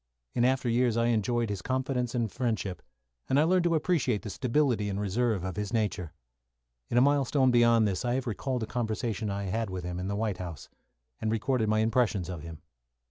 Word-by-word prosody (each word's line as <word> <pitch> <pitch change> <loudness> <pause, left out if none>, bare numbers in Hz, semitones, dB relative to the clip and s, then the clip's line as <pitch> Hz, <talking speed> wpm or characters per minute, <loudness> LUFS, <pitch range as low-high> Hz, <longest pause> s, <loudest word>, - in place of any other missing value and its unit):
In 120 - +1
after 130 0 +1
years 120 0 +2
I 115 0 +2
enjoyed 115 0 +1
his 100 -3 -3
confidence 130 0 -1
and 115 -4 0
friendship, 110 -7 -2 0.5
and 135 - +4
I - - +5
learned 180 +2 +3
to 170 -1 +3
appreciate 145 - +1
the 105 - -5
stability 120 -2 +1
and 100 0 -2
reserve 105 0 0
of 95 -2 -4
his 105 -1 -3
nature. 105 -7 -1 0.8
In 120 - 0
a - - +7
Milestone 140 -1 +3
beyond 115 -2 +5
this, 95 -3 -2
I 120 0 0
have 130 - -2
recalled 125 +1 -2
a - - -1
conversation 110 -1 -2
I 100 0 -3
had 110 +3 -2
with 95 -1 -5
him 90 0 -4
at 90 - -3
the 100 - -2
White 105 -3 -1
House, 85 -5 -7 0.5
and 110 - -1
recorded 115 0 0
my 110 0 +3
impressions 110 -5 +1
of 90 -4 -5
him. 80 0 -10
115 Hz, 205 wpm, -29 LUFS, 100-125 Hz, 0.8 s, a